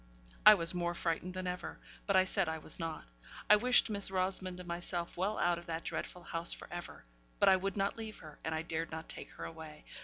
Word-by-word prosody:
I 215 - +12
was 170 -2 +2
more 175 -1 -1
frightened 175 +2 -2
than 185 0 -3
ever; 180 0 -4 0.3
but 200 - +3
I 185 - +7
said 190 -2 0
I 160 - -2
was 155 - -1
not. 165 -1 -4 0.4
I 210 - +9
wished 245 +4 +5
Miss 200 -3 -1
Rosamond 185 -1 +1
and 180 - -8
myself 175 0 -3
well 195 +4 -1
out 175 -1 +2
of 170 - -14
that 165 0 -3
dreadful 180 - -4
house 170 0 -2
for - - -6
ever; 175 0 -7 0.3
but - - +4
I 190 - +7
would 195 +1 -2
not 200 +2 0
leave 220 -1 -6
her, 155 -2 -12
and 160 - -2
I 160 - -2
dared 165 0 -3
not 160 0 -6
take - - -7
her - - -7
away. 160 -2 -9
175 Hz, 235 wpm, -34 LUFS, 165-190 Hz, 0.4 s, I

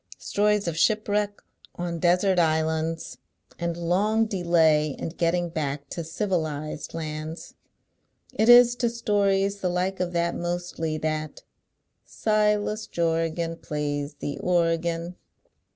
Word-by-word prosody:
Stories 210 -1 +1
of 165 -1 -2
shipwreck 210 -1 +1 0.3
on 175 -1 -4
desert 180 +2 +3
islands, 160 0 0 0.4
and 170 -1 -2
long 200 +6 +2
delay 165 - +2
in - - -4
getting 175 +1 0
back 145 -3 -3
to 170 - -4
civilised 160 -4 -3
lauds. 155 0 -6 0.8
It 220 +2 +2
is 240 0 +8
to 240 -1 +1
stories 200 -3 +1
the 185 - -1
like 180 +2 -1
of 180 -1 -1
that, 170 0 +1
mostly, 175 -2 -3
that 155 0 -3 0.6
Silas 210 0 0
Jorgan 165 0 -1
Plays 145 -2 -3
the 145 0 -5
organ." 170 0 0
170 Hz, 115 wpm, -25 LUFS, 160-200 Hz, 0.8 s, is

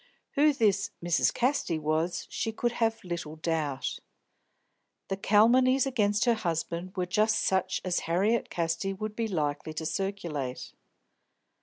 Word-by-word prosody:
Who 300 +1 +4
this 215 -6 +2
"Mrs. 170 -2 +2
Casty" 250 - 0
was 155 +3 -1
she 225 - -2
could 240 +2 -1
have 225 -1 0
little 170 -4 -5
doubt. 155 -4 -2 1.1
The 195 - 0
calumnies 245 +7 +4
against 210 -5 +1
her 240 - +4
husband 170 -3 -3
were 180 - +1
just 215 +4 +2
such 190 0 +1
as 180 -1 +1
Harriet 200 +7 +2
Casti 170 +3 -1
would 215 +2 -5
be 230 0 -1
likely 155 -4 -2
to 160 +1 -4
circulate. 165 -9 -3
190 Hz, 135 wpm, -29 LUFS, 165-225 Hz, 1.1 s, Who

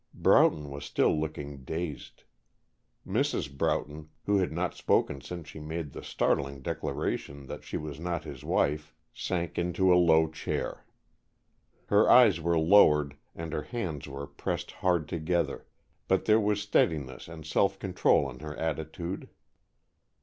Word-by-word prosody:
Broughton 75 -2 +4
was 70 +1 -6
still - - +2
looking 75 -3 -4
dazed. 80 0 -5 0.8
Mrs. 95 - -1
Broughton, 75 +2 -2 0.2
who 100 -1 +3
had 90 - 0
not 85 +2 -1
spoken 70 -1 +1
since 85 +2 -7
she - - -9
made 80 -1 -5
the - - -7
startling 70 -1 -1
declaration 70 +1 -3
that - - -8
she - - -4
was 75 -2 -6
not 85 -1 -3
his 70 -5 -9
wife, 75 +1 0 0.2
sank 85 -3 -2
into 90 +1 +3
a 90 - +6
low 80 -2 +5
chair. 80 0 -4 1.0
Her 105 +1 +4
eyes 110 -9 +7
were 85 +1 +1
lowered 75 -4 +5 0.2
and 85 -1 -6
her - - -1
hands 80 - -4
were 70 0 -6
pressed - - -4
hard 90 -4 0
together, 85 +2 -1 0.4
but 95 - +2
there 110 0 +5
was 105 0 +1
steadiness 75 -9 0
and 80 -2 -10
self 95 +5 +1
control 95 -2 +2
in - - -9
her 75 0 -7
attitude. 80 +3 -4
80 Hz, 145 wpm, -29 LUFS, 75-90 Hz, 1.0 s, eyes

